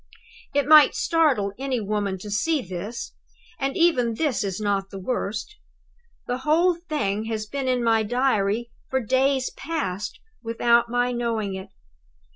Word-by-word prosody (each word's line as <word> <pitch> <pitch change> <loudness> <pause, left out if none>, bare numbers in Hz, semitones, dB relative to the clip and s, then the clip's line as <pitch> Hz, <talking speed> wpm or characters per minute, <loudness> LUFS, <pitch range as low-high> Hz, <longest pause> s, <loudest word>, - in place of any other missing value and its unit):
"It 285 -2 +3
might 305 -1 +8
startle 275 - +2
any 265 -2 -1
woman 205 -2 -2
to 210 - -7
see 295 +8 +1
this, 195 +6 -6 0.5
and 270 0 -1
even 255 -10 +3
this 285 -5 0
is 195 0 -3
not 200 -2 -1
the 195 - -8
worst. 220 - -3 0.7
The 245 +1 -2
whole 325 +6 +3
thing 260 - -2
has 220 -1 -3
been 270 +4 -4
in 250 -1 +1
my 225 -1 +3
Diary, 235 -1 0 0.2
for 265 - +1
days 260 +2 +1
past, 210 - -4 0.2
without 235 0 +2
my 245 +1 +1
knowing 230 -4 -2
it! 190 0 -7
235 Hz, 145 wpm, -24 LUFS, 210-275 Hz, 0.7 s, might